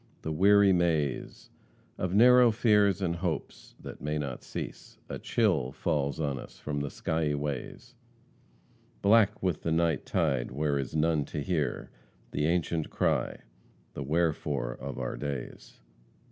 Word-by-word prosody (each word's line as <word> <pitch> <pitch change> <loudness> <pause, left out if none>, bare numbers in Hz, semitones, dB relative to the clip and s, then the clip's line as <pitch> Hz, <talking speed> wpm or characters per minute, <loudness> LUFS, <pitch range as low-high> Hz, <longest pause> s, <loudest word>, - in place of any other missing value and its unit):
the 80 - -3
weary 100 +4 +5
maze 80 -6 -1 0.5
Of 90 +1 -1
narrow 125 +2 +7
fears 105 -4 +3
and 85 -2 0
hopes, 85 -3 -4
that - - -10
may 75 +1 -2
not 70 -4 -4
cease, - - -7
A - - -5
chill 65 +1 +1
falls 70 -1 -1
on 70 -4 -1
us - - -11
from 75 -1 -4
the 70 0 -3
skiey 80 -1 -1
ways, 70 -3 -5 1.1
Black 105 0 +4
with 90 -5 0
the 80 - -2
night 80 -3 +1
tide 70 -7 0
where 70 +2 -1
is 70 +2 -4
none 80 -1 +2
to 75 - -4
hear 80 -4 -2 0.4
The 75 - 0
ancient 85 -2 0
cry, - - 0 0.5
the - - -6
wherefore 75 -4 0
of 70 +3 -7
our - - -3
days." 70 -4 -6
80 Hz, 145 wpm, -29 LUFS, 70-90 Hz, 1.1 s, narrow